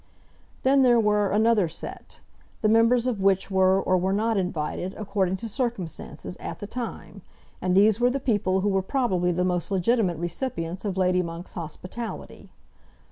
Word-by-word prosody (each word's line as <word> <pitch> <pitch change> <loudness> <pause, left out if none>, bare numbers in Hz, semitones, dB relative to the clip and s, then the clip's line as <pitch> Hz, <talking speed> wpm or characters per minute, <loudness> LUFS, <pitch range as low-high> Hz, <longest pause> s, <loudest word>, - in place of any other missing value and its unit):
Then 270 +1 +4
there 245 -2 +5
were 210 -2 +2
another 215 -2 +3
set, 160 - -8 0.4
the 215 - +3
members 230 +2 +4
of 235 -6 -1
which 195 0 +2
were 190 0 +4
or 185 -1 +1
were 190 +2 0
not 220 +3 +1
invited, 180 0 -2
according 195 -3 -1
to 230 +4 -6
circumstances, 195 - -4
at - - -6
the 205 - -7
time; 205 -5 -7 0.4
and 185 0 +1
these 210 +2 +5
were 245 0 +4
the 275 +2 -1
people 205 -7 +1
who 205 - +1
were 195 -1 +1
probably 190 -6 0
the 180 +1 0
most 180 -2 -1
legitimate 195 -2 +1
recipients 175 - -4
of 195 -2 -2
Lady 180 -1 +2
Monk's 170 0 -7
hospitality. 180 +7 -7
195 Hz, 165 wpm, -25 LUFS, 180-230 Hz, 0.4 s, there